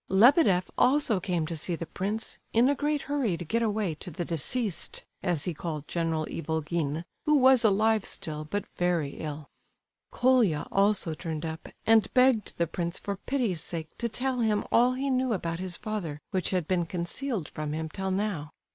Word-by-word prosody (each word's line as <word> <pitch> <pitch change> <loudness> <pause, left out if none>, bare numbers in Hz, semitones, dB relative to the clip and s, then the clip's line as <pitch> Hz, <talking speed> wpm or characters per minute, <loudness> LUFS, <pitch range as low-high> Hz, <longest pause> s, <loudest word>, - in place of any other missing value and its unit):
Lebedeff 200 - +5
also 255 -6 +4
came 175 -3 -1
to 165 - -4
see 170 +3 -1
the 170 - -5
prince, 205 +6 -3
in 235 +3 +5
a - - +4
great 295 +1 -1
hurry 265 -11 0
to 175 - -6
get 230 +9 0
away 210 -5 0
to 155 - -8
the 175 +1 -4
"deceased," 190 - -2 0.2
as 175 -5 0
he 180 - -1
called 155 -2 -5
General 165 -2 -1
Ivolgin, 160 -1 -2 0.2
who 300 - +5
was 260 -2 +6
alive 215 0 +3
still, 155 -4 -5
but 200 +6 -3
very 175 -5 0
ill. 150 -1 -6 0.6
Colia 240 - +3
also 195 -4 +2
turned 160 -1 -4
up, 160 0 -6 0.2
and 220 -2 +4
begged 250 -4 +3
the 170 - +2
prince 170 +1 -3
for 200 - -3
pity's 215 - -1
sake 160 -1 -3
to 235 - -1
tell 255 +3 -1
him 215 -3 +2
all 245 +2 +5
he 270 +2 -1
knew 255 -2 +1
about 170 -4 -2
his 185 -2 -4
father 185 -9 -4
which 190 -3 0
had 180 -4 -1
been 175 -3 +1
concealed 185 - -2
from 150 -1 -5
him 160 +1 -2
till 190 +5 -4
now. 190 -6 -1
185 Hz, 180 wpm, -28 LUFS, 165-230 Hz, 0.6 s, was